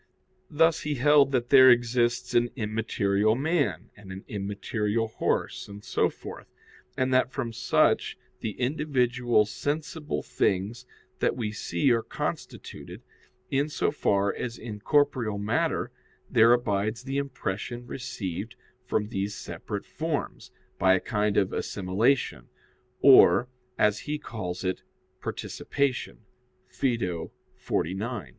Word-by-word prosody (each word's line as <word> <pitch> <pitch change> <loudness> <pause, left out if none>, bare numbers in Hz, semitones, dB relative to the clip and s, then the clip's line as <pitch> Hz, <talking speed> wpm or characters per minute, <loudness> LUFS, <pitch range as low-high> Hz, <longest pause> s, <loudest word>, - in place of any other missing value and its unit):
Thus 165 +1 +3
he 150 -1 -2
held 140 +1 +5
that 125 -2 -1
there 130 -2 +9
exists 120 0 +2
an 120 0 +3
immaterial 110 -2 +1
man, 135 - -1
and 100 -2 -12
an 95 +1 -8
immaterial 105 +2 -2
horse, - - -2
and 100 0 -10
so - - +1
forth, - - -10 0.5
and 130 0 +1
that 130 0 +3
from 120 -4 -4
such - - +2 0.2
the 110 - -5
individual 125 -5 +1
sensible 150 - -3
things 105 +7 -1 0.3
that - - +1
we 110 -4 -2
see 130 +5 0
are 115 -1 +3
constituted, - - -6 0.5
in 140 +2 +1
so 150 - 0
far 100 -8 +1
as 120 -1 -5
in 110 -3 -7
corporeal 125 -4 +1
matter 105 +4 0 0.4
there 115 +1 +6
abides 110 -1 +1
the 135 +1 -2
impression 120 -3 -4
received 110 -5 -5 0.3
from 105 -4 -1
these 100 -1 -3
separate 105 - -6
forms, 160 -2 -4 0.3
by 95 0 +5
a - - +1
kind 105 +1 0
of 95 - +2
assimilation, 105 +8 0 0.5
or 130 -2 +7 0.3
as 105 0 +3
he 150 0 -3
calls 100 -11 -6
it, 95 -1 -2 0.4
"participation" 140 -3 -3 0.5
(Phaedo 95 -11 -2 0.2
xlix). 95 - -3
115 Hz, 125 wpm, -27 LUFS, 105-130 Hz, 0.5 s, there